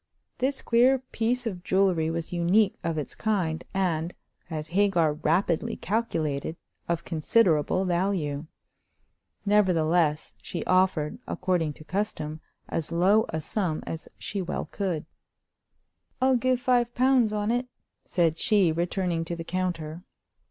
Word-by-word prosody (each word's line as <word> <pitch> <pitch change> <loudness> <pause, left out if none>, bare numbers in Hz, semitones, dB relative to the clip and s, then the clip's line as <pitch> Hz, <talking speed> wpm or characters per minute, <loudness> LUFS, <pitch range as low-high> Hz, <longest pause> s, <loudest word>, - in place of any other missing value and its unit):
This 265 +2 -1
queer 245 +3 +4
piece 245 -1 -2
of 185 -6 -4
jewelry 185 -5 +2
was 165 +1 -3
unique 185 +4 +3
of 165 -1 -1
its 150 - -4
kind, 185 -7 -1
and, 175 -3 -1 0.3
as 155 -1 -4
Hagar 175 -4 +3
rapidly 165 +3 0
calculated, 165 -8 -2 0.3
of 170 -1 -1
considerable 170 0 +2
value. 170 -5 -1 1.0
Nevertheless, 175 -6 +2
she 170 - -5
offered, 185 -5 +2
according 175 -5 0
to 155 - -14
custom, 155 -3 -3 0.3
as 165 -1 -3
low 195 +6 +4
a 160 - -2
sum 165 0 -2
as 165 - -6
she 200 - -4
well 180 - -3
could. 180 -7 -2 1.1
"I'll 260 0 +4
give 255 +1 +2
five 245 -1 +2
pounds 255 -3 +4
on 210 +1 0
it," 245 +1 0 0.4
said 165 -2 +1
she, 200 -6 +4
returning 170 0 -1
to 170 - -3
the 165 - -6
counter. 170 -2 -3
180 Hz, 130 wpm, -27 LUFS, 160-210 Hz, 1.1 s, queer